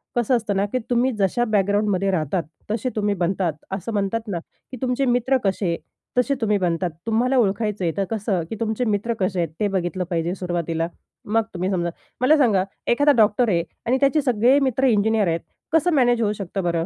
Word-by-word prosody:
कसं 240 +1 +2
असतं 215 -4 -1
ना, 195 +1 +2
की 255 - 0
तुम्ही 245 +2 +2
जशा 195 +5 +2
बॅकग्राउंडमध्ये 205 -2 +1
राहतात, 165 0 0 0.3
तसे 235 +4 -1
तुम्ही 205 -1 +1
बनतात. 180 -1 0 0.2
असं 195 +3 -4
म्हणतात 210 +3 -1
ना, 195 -4 -2 0.3
की 255 - -6
तुमचे 255 +1 0
मित्र 245 +1 +2
कसे, 190 -3 0 0.4
तसे 265 +3 +2
तुम्ही 210 -2 +2
बनतात 175 -1 0 0.2
तुम्हाला 245 +4 +2
ओळखायचं 210 -2 +1
आहे 165 - +1
तर 200 - +2
कसं, 205 -4 -1
की - - -4
तुमचे 225 +2 -1
मित्र 215 +2 0
कसे 185 -1 0
आहेत? 170 -2 0
ते 210 - +2
बघितलं 185 -1 -1
पाहिजे 170 0 -1
सुरुवातीला. 170 -3 -2 0.4
मग 225 +2 +2
तुम्ही 185 +1 -2
समजा 175 -2 0 0.3
मला 295 +5 +5
सांगा 220 -10 +3 0.3
एखादा 285 +5 +4
डॉक्टर 215 +2 +4
आहे 170 -4 +2 0.2
आणि 250 +3 +2
त्याचे 280 +2 +3
सगळे 250 0 +3
मित्र 265 -1 +1
इंजिनिअर 220 -2 +2
आहेत 165 0 0 0.3
कसं 325 +2 +3
मॅनेज 245 -4 +3
होऊ 210 -2 +2
शकतं 195 -1 -4
बरं? 170 -1 0
210 Hz, 190 wpm, -22 LUFS, 185-240 Hz, 0.4 s, मला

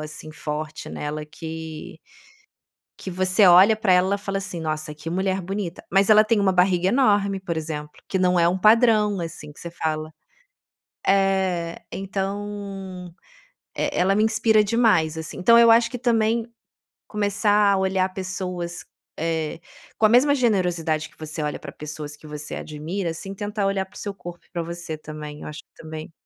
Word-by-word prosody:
assim, 155 0 -8
forte 150 0 -5
nela 150 +1 -4
que 160 0 -8 1.0
que 190 - -7
você 185 +3 +3
olha 185 +5 +8
pra 215 -4 +2
ela 185 +2 +4
e - - -2
fala, 195 0 -3
assim: 190 -3 -6
"Nossa 155 -1 -3
que 155 +2 -7
mulher 190 +1 0
bonita", 190 -1 -5
mas 195 +1 +3
ela 215 0 +8
tem 225 0 +2
uma 190 -1 +3
barriga 180 0 +3
enorme, 205 -5 +2
por 170 -3 -4
exemplo, 150 -1 -4 0.2
que 190 - -1
não 180 -1 +3
é 170 0 +4
um 180 - +1
padrão, 215 -1 +4
assim, 165 -3 -7
que - - -19
você 170 - -7
fala 155 -2 -3 1.0
eh, 190 -3 +1
então, 195 -2 -5 0.6
é - - -2
é - - +2
ela 195 +2 +3
me 215 - +3
inspira 220 -1 +3
demais, 205 -8 +2
assim. 160 - -6
Então, 230 +6 +6
eu 230 0 +7
acho 230 +2 +5
que 250 - -4
também 230 -1 +1 0.6
começar 205 0 +2
a - - +2
olhar 190 0 +1
pessoas, 180 -2 -4 0.3
eh, 160 0 -2 0.4
com 220 - +3
a - - +6
mesma 275 +5 +5
generosidade 175 - +1
que - - -26
você 155 0 -5
olha 150 0 -2
pra 140 - -8
pessoas 150 0 -7
que 155 - -14
você 150 -1 -6
admira, 165 +4 -4
assim, 195 +4 -7
tentar 205 0 -3
olhar 195 -1 0
paro - - -24
o - - -8
seu 205 - -4
corpo 175 -3 -10
e - - -33
pra 170 -1 -2
você 170 -1 -6
também, 150 -1 -8
eu - - -7
acho 150 0 -7
que - - -18
também 155 0 -7
185 Hz, 180 wpm, -23 LUFS, 160-205 Hz, 1.0 s, olha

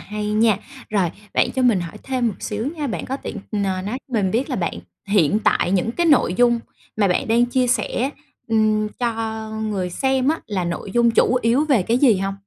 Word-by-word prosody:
hay 210 0 -4
nha. 215 -2 +3 0.3
Rồi, 195 -5 +1 0.2
bạn - - +3
cho 260 - -1
mình 230 -7 +3
hỏi 175 +4 -7
thêm 255 -3 0
một 200 - -4
xíu 215 +3 -3
nha, 295 -2 -2
bạn 230 - -4
có 265 - -3
tiện, 235 - -7 0.2
ờ, 210 - 0 0.2
nói 215 +7 -3
cho - - -18
mình 200 -5 +1
biết 245 +5 -1
là - - -1
bạn - - -2 0.3
hiện 200 -1 +3
tại - - +2
những 195 +4 +1
cái 345 +3 0
nội 265 - +4
dung 240 +1 +3 0.4
mà 205 -3 +3
bạn 180 - 0
đang 235 +2 +4
chia 255 +1 +1
sẻ, 250 +1 0 0.4
ừm, 215 -1 +2
cho 225 -2 -3
người 195 -4 -2
xem 265 +5 +1
á 320 - +1
là 190 -4 -2
nội 175 +3 -4
dung 235 -1 +4
chủ 250 +2 +3
yếu 240 +6 +3
về 270 -10 +3
cái 230 +6 +1
gì 250 -7 +5
hông? 195 +1 -2
225 Hz, 220 wpm, -21 LUFS, 205-250 Hz, 0.4 s, gì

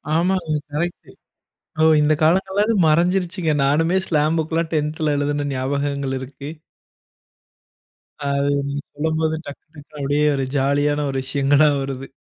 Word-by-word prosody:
ஆமாங்க. 170 -2 +1 0.2
கரெக்ட்டு! 170 +4 -4 0.7
ஓ, - - +5 0.2
இந்த 150 +1 +3
காலங்கள்ல 190 +5 +2
அது 230 - +1
மறைஞ்சிருச்சுங்க 175 +1 +1
நானுமே 165 +6 +2
ஸ்லாம் 155 +1 +1
புக் 160 0 -2
கெல்லாம் 165 0 -1
10த்ல 150 0 0
எழுதின 145 0 -1
ஞாபகங்கள் 140 +1 -2
இருக்கு. 140 +2 -8 1.7
அ. 145 - -6
அது 140 +1 +1 0.2
நீங்க 140 +1 -3
சொல்லும்போது 160 +1 -1
டக்கு 145 - -10
டக்குனு 150 +1 -14
அப்படியே 145 +2 +1
ஒரு 135 -1 -1
ஜாலி 140 +2 +1
யான 145 0 0
ஒரு 135 - -3
விஷயங்களா 140 +2 +3
வருது. 135 0 -5
150 Hz, 140 wpm, -21 LUFS, 140-160 Hz, 1.7 s, ஓ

